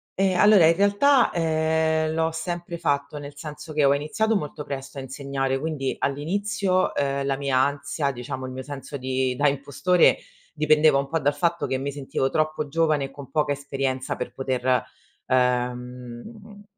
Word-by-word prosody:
Ehm, 190 -2 +1
allora 205 -5 +7
in 165 - +5
realtà, 230 +7 +4
uhm, 160 -1 +1
l'ho 165 0 +1
sempre 175 +1 -4
fatto, 145 -2 -1
nel 145 0 -9
senso 150 +1 -8
che 150 -1 +2
ho 140 - +5
iniziato 210 +10 0
molto 150 -4 -4
presto 135 0 -6
a - - -3
insegnare. 135 0 -2
Quindi 145 -3 -2
all'inizio, 185 +6 0
ehm, 140 0 0
la 135 -1 0
mia 140 -2 -1
ansia, 140 +1 0
diciamo 130 +1 -5
il 130 - -7
mio 130 0 -6
senso 140 0 -7
di 130 -1 -1
da 145 +1 +3
impostore, 145 +6 +2 0.3
dipendeva 155 -1 +4
un 140 0 -2
po' 165 -1 -1
dal 145 +1 +1
fatto 170 +3 0
che 130 - -1
mi 140 +1 -3
sentivo 135 -1 -2
troppo 155 -1 0
giovane 155 -2 +1
e 135 - -6
con 140 -1 -11
poca 150 -2 +1
esperienza 135 -2 -3
per - - -5
poter 130 -2 0 0.4
ehm, 125 - -2
145 Hz, 170 wpm, -24 LUFS, 135-160 Hz, 0.4 s, allora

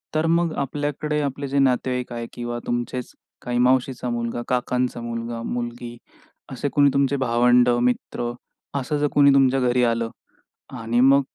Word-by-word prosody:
तर 155 +1 +2
मग 170 -1 +2
आपल्याकडे, 145 +2 -2
आपले 140 0 -3
जे 140 +1 0
नातेवाईक 125 -1 +1
आहे 115 0 -5
किंवा 120 0 -4
तुमचेच 120 +1 -3 0.3
काही 120 0 -3
मावशीचा 125 0 +1
मुलगा, 120 0 -3
काकांचा 125 -1 -1
मुलगा, 115 0 -5
मुलगी 120 0 -5 0.5
असे 130 +2 -3
कोणी 145 -1 +5
तुमचे 140 0 +2
भावंड, 125 -1 +3
मित्र 120 0 0 0.5
असं 140 +3 -2
जर 145 0 +1
कोणी 140 -1 +6
तुमच्या 135 -1 +4
घरी 125 -1 +2
आलं 115 -1 +1 0.7
आणि 115 +1 0
मग 135 +2 +6
125 Hz, 150 wpm, -23 LUFS, 120-140 Hz, 0.7 s, कोणी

